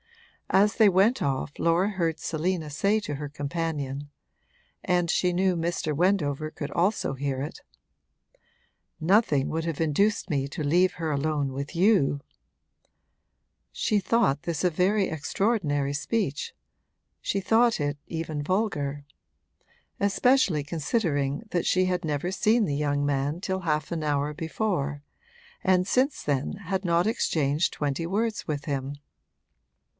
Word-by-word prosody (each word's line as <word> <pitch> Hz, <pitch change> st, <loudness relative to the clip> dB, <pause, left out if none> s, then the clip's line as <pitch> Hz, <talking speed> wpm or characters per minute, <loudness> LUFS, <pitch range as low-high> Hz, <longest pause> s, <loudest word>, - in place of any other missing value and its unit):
As 205 Hz, +2 st, +4 dB
they 220 Hz, -3 st, +7 dB
went 200 Hz, +7 st, +3 dB
off 140 Hz, 0 st, -2 dB
Laura 170 Hz, +4 st, +2 dB
heard 170 Hz, -5 st, -1 dB
Selina 165 Hz, 0 st, -2 dB
say 200 Hz, +8 st, +2 dB
to 150 Hz, -8 st, -4 dB
her 145 Hz, +1 st, -5 dB
companion 145 Hz, -1 st, -3 dB, 0.7 s
and 175 Hz, -1 st, +1 dB
she 180 Hz, +1 st, +2 dB
knew 185 Hz, +1 st, +2 dB
Mr. 165 Hz, -2 st, -1 dB
Wendover 155 Hz, -4 st, +1 dB
could 145 Hz, -2 st, -6 dB
also 175 Hz, -3 st, +1 dB
hear 135 Hz, -1 st, -2 dB
it 145 Hz, -, -6 dB, 1.4 s
'Nothing 160 Hz, -, +3 dB
would 160 Hz, +1 st, -2 dB
have 165 Hz, -3 st, -3 dB
induced 195 Hz, +8 st, +1 dB
me 140 Hz, -4 st, 0 dB
to 155 Hz, +2 st, -4 dB
leave 175 Hz, +6 st, +3 dB
her 160 Hz, -2 st, -3 dB
alone 145 Hz, -1 st, -1 dB
with 140 Hz, +4 st, -5 dB
you!' 175 Hz, -7 st, +3 dB, 1.5 s
She 210 Hz, -, +1 dB
thought 190 Hz, -, +2 dB
this 170 Hz, 0 st, -3 dB
a 180 Hz, -, +4 dB
very 190 Hz, +4 st, +2 dB
extraordinary 150 Hz, -3 st, 0 dB
speech 150 Hz, -1 st, -2 dB, 0.7 s
she 200 Hz, -, -1 dB
thought 225 Hz, +3 st, +3 dB
it 145 Hz, 0 st, -1 dB
even 160 Hz, -3 st, -4 dB
vulgar; 145 Hz, -6 st, -1 dB, 1.0 s
especially 200 Hz, -, +3 dB
considering 150 Hz, -1 st, -1 dB
that 175 Hz, -, 0 dB
she 185 Hz, 0 st, +3 dB
had 180 Hz, -1 st, -1 dB
never 150 Hz, +2 st, -1 dB
seen 215 Hz, +4 st, +3 dB
the 145 Hz, -, -1 dB
young 145 Hz, -1 st, 0 dB
man 145 Hz, +3 st, 0 dB
till 190 Hz, 0 st, -2 dB
half 155 Hz, -3 st, -1 dB
an 165 Hz, -2 st, -2 dB
hour 145 Hz, 0 st, 0 dB
before 150 Hz, -3 st, -2 dB, 0.6 s
and 185 Hz, -1 st, +3 dB
since 265 Hz, +5 st, +1 dB
then 140 Hz, -2 st, -1 dB
had 195 Hz, -1 st, -3 dB
not 170 Hz, +1 st, +2 dB
exchanged 155 Hz, -, +1 dB
twenty 145 Hz, +2 st, -2 dB
words 215 Hz, +4 st, -1 dB
with 145 Hz, -3 st, -3 dB
him. 140 Hz, -1 st, -3 dB
165 Hz, 135 wpm, -26 LUFS, 145-190 Hz, 1.5 s, they